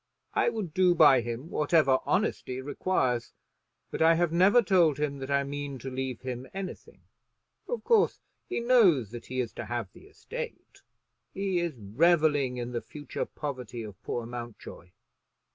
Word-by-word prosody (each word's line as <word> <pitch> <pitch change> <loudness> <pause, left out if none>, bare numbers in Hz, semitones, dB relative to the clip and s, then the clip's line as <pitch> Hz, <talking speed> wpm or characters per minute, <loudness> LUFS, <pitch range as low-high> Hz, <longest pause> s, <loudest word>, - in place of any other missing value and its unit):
I - - +3
would 215 -9 -4
do 180 0 +4
by 145 -6 +7
him 120 +7 -6
whatever 150 -4 +3
honesty 130 -10 -1
requires; 130 -3 -1 0.6
but - - -4
I 165 +1 +6
have 170 -1 +1
never 195 +8 +5
told 175 -7 +3
him 145 -2 -2
that 135 0 -6
I 140 0 +2
mean 140 0 -5
to 130 +2 -7
leave 130 -2 -4
him 130 0 -5
anything. 195 -1 -7 0.7
Of 485 - -3
course 450 -3 +3 0.3
he 365 - -2
knows 195 - +4
that 120 -1 -9
he 130 0 -4
is 120 -3 -2
to - - -6
have 120 -5 -4
the - - -16
estate. - - -8 0.5
He 195 -2 0
is 170 -4 -2
revelling 145 - +2
in 120 0 -4
the 120 -1 -3
future 145 -1 -6
poverty 125 -5 -6
of 105 -4 -10
poor 120 - -3
Mountjoy. 120 -6 -9
140 Hz, 160 wpm, -28 LUFS, 125-175 Hz, 0.7 s, by